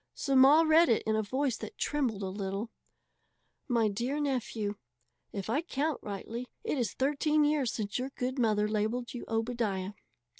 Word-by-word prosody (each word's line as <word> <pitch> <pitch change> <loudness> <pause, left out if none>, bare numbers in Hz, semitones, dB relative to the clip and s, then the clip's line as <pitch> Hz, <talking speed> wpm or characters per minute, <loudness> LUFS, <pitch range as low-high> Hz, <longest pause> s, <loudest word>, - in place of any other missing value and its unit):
So 275 -2 -1
Ma 275 +5 +7
read 320 0 +5
it 230 - +3
in 220 - +1
a 220 - +2
voice 260 +3 -1
that 215 - -8
trembled 245 -9 -1
a 190 - -2
little: 195 +3 -4 1.0
MY 230 -4 +2
DEAR 240 +8 -2
NEPHEW: 235 -7 -2 0.6
If 195 -2 -5
I 240 +8 +1
count 310 -3 -2
rightly, 225 +4 -5 0.2
it 290 - -1
is 235 - -1
thirteen 295 +3 +2
years 290 -5 +1
since 210 +1 -3
your 260 +2 -3
good 255 0 -3
mother 210 -3 +2
labelled 220 +3 -1
you 245 - -6
Obadiah. 225 -4 -1
240 Hz, 165 wpm, -30 LUFS, 215-275 Hz, 1.0 s, Ma